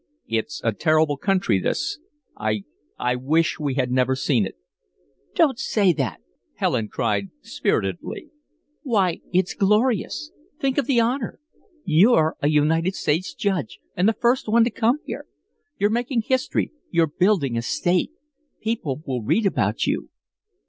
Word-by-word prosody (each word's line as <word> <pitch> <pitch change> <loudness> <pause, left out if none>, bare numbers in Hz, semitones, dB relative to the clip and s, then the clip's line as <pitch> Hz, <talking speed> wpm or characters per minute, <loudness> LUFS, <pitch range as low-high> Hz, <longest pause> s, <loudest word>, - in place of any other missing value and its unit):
"It's 115 +7 -2
a 115 -2 +1
terrible 155 +3 +2
country 180 - +1
this 95 - -2 0.4
I 105 -1 -1 0.3
I 125 0 0
wish 155 +7 +1
we 145 -3 -1
had 130 -2 0
never 130 +1 +2
seen 125 -6 +1
it." - - -11 0.8
"Don't 265 -5 +3
say 200 -5 +2
that," 125 - -3 0.3
Helen 110 - 0
cried, 105 -3 -1
spiritedly. 95 - -2 0.5
"Why, 200 - +1
it's 180 +1 +1
glorious. 215 - +1 0.3
Think 270 0 +1
of 280 - -1
the 265 -4 +3
honor. 235 +2 -1 0.5
You're 160 -1 +4
a 145 - +2
United 160 +5 +2
States 165 +5 -1
judge 185 - -2 0.2
and 185 +5 +3
the - - +2
first 245 +1 +2
one 230 +1 +5
to 235 - +1
come 230 +5 +2
here. - - -6 0.5
You're 205 +1 +2
making 240 0 0
history 215 - 0 0.2
you're 170 -1 +3
building 160 - +1
a 115 - 0
State 175 +8 0 0.5
people 160 - -3
will 130 -3 -2
read 210 - +1
about 110 - +1
you." - - -1
165 Hz, 145 wpm, -23 LUFS, -, 0.8 s, one